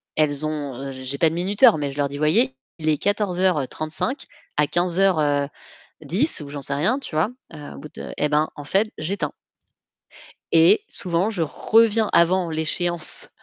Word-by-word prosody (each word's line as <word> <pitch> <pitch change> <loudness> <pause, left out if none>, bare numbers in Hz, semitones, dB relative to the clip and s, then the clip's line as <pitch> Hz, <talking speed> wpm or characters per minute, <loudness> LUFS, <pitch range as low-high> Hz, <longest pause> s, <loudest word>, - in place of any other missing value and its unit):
elles 150 -1 +1
ont 140 -3 -4
j'ai 130 +1 -4
pas 160 - +4
de 165 - -5
minuteur, 185 -1 +4
mais 145 -2 -2
je 135 - -11
leur 140 -1 0
dis: 145 - -6
«Voyez, 145 -4 +2 0.2
il 155 0 -1
est 150 - +2
14:35 185 - -1 0.3
à 150 -1 +3
15:10» 170 - -1
ou 145 - -8
j'en 145 -1 -6
sais 140 +1 -3
rien, 215 - +1
tu 165 - -8
vois? 160 +8 +2 0.2
Heu, 150 -2 -9
au - - -10
bout 150 - -10
de - - -7
eh 150 - +1
ben 150 +1 +2
en 145 -2 -9
fait 200 +7 +1
j'éteins. 185 +6 -2 1.2
Et 165 - +5
souvent, 180 +3 -1
je 185 -7 -2
reviens 220 - +2
avant 175 0 +3
l'échéance 160 +1 0
155 Hz, 165 wpm, -22 LUFS, 145-185 Hz, 1.2 s, Et